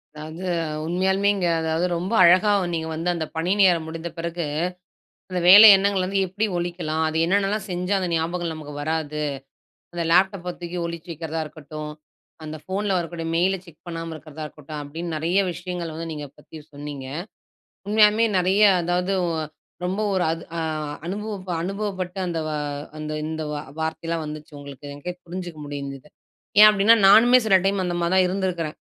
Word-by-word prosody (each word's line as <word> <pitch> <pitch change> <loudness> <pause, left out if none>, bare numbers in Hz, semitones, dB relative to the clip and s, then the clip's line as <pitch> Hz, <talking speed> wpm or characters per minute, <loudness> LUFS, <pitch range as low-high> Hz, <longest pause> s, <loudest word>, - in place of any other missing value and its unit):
அதாவது, 155 +4 -7 0.4
உண்மையாலுமேங்க, 190 +2 +1
அதாவது 160 +2 0
ரொம்ப 185 +6 -3
அழகா 185 +5 +6 0.2
நீங்க 160 -1 -2
வந்து 165 +2 -2
அந்த 160 -2 -2
பணி 165 +3 0
நேரம் 175 -4 +4
முடிந்த 165 +1 -5
பிறகு, 170 0 -3 0.9
அந்த 180 - -1
வேலை 205 +4 +11
எண்ணங்கள 195 -1 +1
வந்து 195 +1 0
எப்பிடி 205 +4 -1
ஒழிக்கலாம்? 170 -2 -2
அது 155 - -4
என்னென்னலாம் 200 +3 +1
செஞ்சா 180 +3 -1
அந்த 180 - -2
ஞாபகம் 165 +1 -1
நமக்கு 155 -2 -8
வராது? 155 -1 -2 0.7
அந்த 170 - -1
லேப்டாப்ப 180 0 +2
தூக்கி 175 +1 -5
ஒழிச்சு 170 0 -6
வைக்கிறதா 160 0 -4
இருக்கட்டும், 150 0 -8 0.5
அந்த 155 0 -6
ஃபோன்ல 195 +1 -2
வரக்கூடிய 165 -1 -5
மெயில் 185 +3 +2
ல - - -4
செக் 170 -2 -18
பண்ணாம 165 -1 -5
இருக்கிறதா 155 0 -9
இருக்கட்டும், 150 0 -9
அப்பிடின்னு 160 +3 -5
நிறைய 170 +5 +1
விஷயங்கள் 175 -1 -5
வந்து 165 +1 -5
நீங்க 150 -1 -6
பத்தி 160 - -14 0.2
சொன்னீங்க. 145 -2 -7 0.8
உண்மையாலுமே 215 +1 +5
நிறைய 190 +3 +2 0.2
அதாவது 180 +2 0
ஒ 170 - -1 0.5
ரொம்ப 190 +4 -1
ஒரு 185 -2 +1
அது 165 +1 -5
அ - - -1 0.5
அனுபவப்ப 200 0 -5
அனுபவப்பட்டு 190 -1 -4
அந்த 170 -2 -2
வா 155 -1 -2 0.4
அந்த 155 0 -5 0.2
இந்த 160 0 -4
வா 145 - -3 0.2
வார்த்தையெல்லாம் 160 +1 -2
வந்துச்சு. 150 +1 -8
உங்களுக்கு 140 0 -11
எனக்கே 145 +5 -6
புரிஞ்சிக்க 175 -2 -7
முடிஞ்சது. 140 -1 -7 0.5
ஏன் 215 - +11
அப்பிடின்னா, 210 +2 +5
நானுமே 240 +5 +7
சில 195 -3 +5
டைம் 195 0 +1
அந்தமாரி 175 0 -1
தான் 185 -1 +5
இருந்திருக்கிறேன். 180 -4 -2
175 Hz, 160 wpm, -23 LUFS, 160-190 Hz, 0.9 s, வேலை